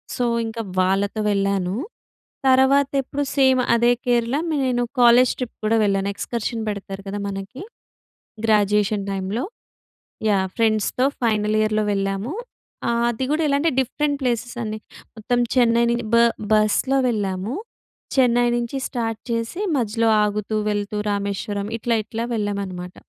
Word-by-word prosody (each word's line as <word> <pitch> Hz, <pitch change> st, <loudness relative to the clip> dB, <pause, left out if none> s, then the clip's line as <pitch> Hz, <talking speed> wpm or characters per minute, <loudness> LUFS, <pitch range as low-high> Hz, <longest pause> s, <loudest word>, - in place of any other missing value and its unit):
So 245 Hz, -, 0 dB, 0.2 s
ఇంక 225 Hz, +1 st, -6 dB, 0.2 s
వాళ్ళతో 195 Hz, +3 st, 0 dB
వెళ్ళాను. 195 Hz, -1 st, 0 dB, 0.7 s
తర్వాత 265 Hz, +2 st, +4 dB
ఎప్పుడు 285 Hz, +2 st, -3 dB
సేమ్ 260 Hz, -1 st, +5 dB, 0.2 s
అదే 240 Hz, +1 st, +4 dB
కేరళ, 240 Hz, +1 st, +1 dB, 0.3 s
నేను 245 Hz, -1 st, +1 dB, 0.2 s
కాలేజ్ 240 Hz, +1 st, +6 dB
ట్రిప్ 250 Hz, -2 st, -5 dB
కూడా 225 Hz, +1 st, +3 dB
వెళ్ళాను. 195 Hz, 0 st, +1 dB
ఎక్స్‌కర్షన్ 230 Hz, 0 st, -3 dB
పెడతారు 195 Hz, -1 st, -6 dB
కదా 205 Hz, +1 st, -4 dB
మనకి. 195 Hz, +7 st, -7 dB, 0.8 s
గ్రాడ్యుయేషన్ 210 Hz, -1 st, +2 dB
టైమ్‌లో. 195 Hz, +6 st, -2 dB, 0.9 s
యాహ్! 190 Hz, -2 st, +2 dB
ఫ్రెండ్స్‌తో 225 Hz, +3 st, +1 dB, 0.2 s
ఫైనల్ 215 Hz, -1 st, +1 dB
ఇయర్‍‌లో 215 Hz, 0 st, +1 dB
వెళ్ళాము. 195 Hz, +6 st, -2 dB, 0.6 s
ఆహ్, 235 Hz, 0 st, +1 dB
అది 250 Hz, +3 st, -3 dB
గూడా 315 Hz, +1 st, +1 dB
ఎలా 280 Hz, 0 st, +2 dB
అంటే 330 Hz, 0 st, +2 dB
డిఫరెంట్ 285 Hz, +3 st, -1 dB
ప్లేసెస్ 240 Hz, 0 st, -1 dB
అండి. 215 Hz, 0 st, -4 dB, 0.4 s
మొత్తం 245 Hz, +3 st, 0 dB, 0.2 s
చెన్నై 235 Hz, -1 st, +4 dB
నుం 235 Hz, 0 st, 0 dB
బ -, -, +6 dB, 0.4 s
బస్‌లో 215 Hz, +6 st, +3 dB
వెళ్ళాము. 205 Hz, +2 st, -2 dB, 0.6 s
చెన్నై 245 Hz, -2 st, +4 dB
నుంచి 240 Hz, +3 st, -3 dB
స్టార్ట్ 225 Hz, -2 st, -3 dB
చేసి 230 Hz, -, -2 dB, 0.2 s
మధ్యలో 225 Hz, -1 st, +1 dB
ఆగుతూ, 210 Hz, +1 st, -1 dB
వెళ్తూ 205 Hz, 0 st, -2 dB
రామేశ్వరం, 200 Hz, 0 st, -3 dB
ఇట్లా, 235 Hz, 0 st, 0 dB
ఇట్లా 230 Hz, +1 st, -4 dB
వెళ్ళామనమాట. 195 Hz, -4 st, -4 dB
220 Hz, 130 wpm, -22 LUFS, 200-245 Hz, 0.9 s, కాలేజ్